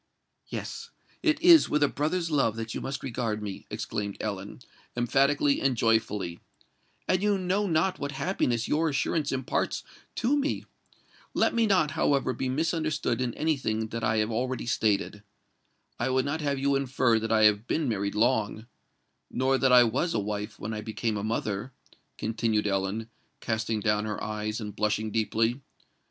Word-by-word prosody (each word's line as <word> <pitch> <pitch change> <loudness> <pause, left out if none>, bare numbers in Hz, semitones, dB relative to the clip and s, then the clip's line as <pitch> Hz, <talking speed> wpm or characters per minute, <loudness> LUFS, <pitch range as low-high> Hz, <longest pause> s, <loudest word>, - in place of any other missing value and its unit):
"Yes—it 315 -2 -4
is 345 -2 +8
with 150 0 +2
a - - +5
brother's 165 +4 -1
love 135 -7 +2
that 115 0 -5
you - - -4
must 135 0 -4
regard 115 -4 -2
me," 100 -2 -6
exclaimed 100 -1 -4
Ellen, 100 +2 -5 0.4
emphatically 140 +4 +2
and 135 -3 +1
joyfully; 105 -6 +1 0.7
"and 185 0 +2
you 205 -1 +2
know 190 +2 0
not 175 +3 +1
what 140 +1 -3
happiness 135 -6 0
your 160 +2 +2
assurance 145 +1 0
imparts 130 -1 -1 0.3
to 245 +5 +2
me! 290 0 -1 0.7
Let - - +3
me 230 -1 +3
not, 185 -7 +3
however, 140 -2 +1
be 130 - -2
misunderstood 155 -4 0
in 120 -2 -2
any 155 -1 +1
thing 110 -3 -2
that 115 0 -4
I 110 0 +2
have 110 +1 +1
already 125 +2 -2
stated. 105 -3 0 0.8
I 120 - 0
would 130 0 +1
not 150 +3 -2
have 140 -2 0
you 140 +1 +1
infer 130 -4 +2
that 115 +1 -3
I 110 -1 +4
have 105 +2 +4
been 155 -3 0
married 100 -3 -1
long—nor 120 +3 -2
that 130 -1 +3
I 125 -1 +8
was 130 +9 0
a - - +2
wife 105 +1 -4
when 110 +2 -5
I 105 - -4
became 110 0 -2
a 100 - -3
mother," 110 +2 -2 0.4
continued 110 -1 0
Ellen, 100 +2 -1 0.3
casting 110 -1 -1
down 105 0 +1
her 105 -1 -4
eyes, 105 +1 -3
and 105 -2 -6
blushing 110 0 0
deeply. 115 +4 0
120 Hz, 165 wpm, -28 LUFS, 110-140 Hz, 0.8 s, is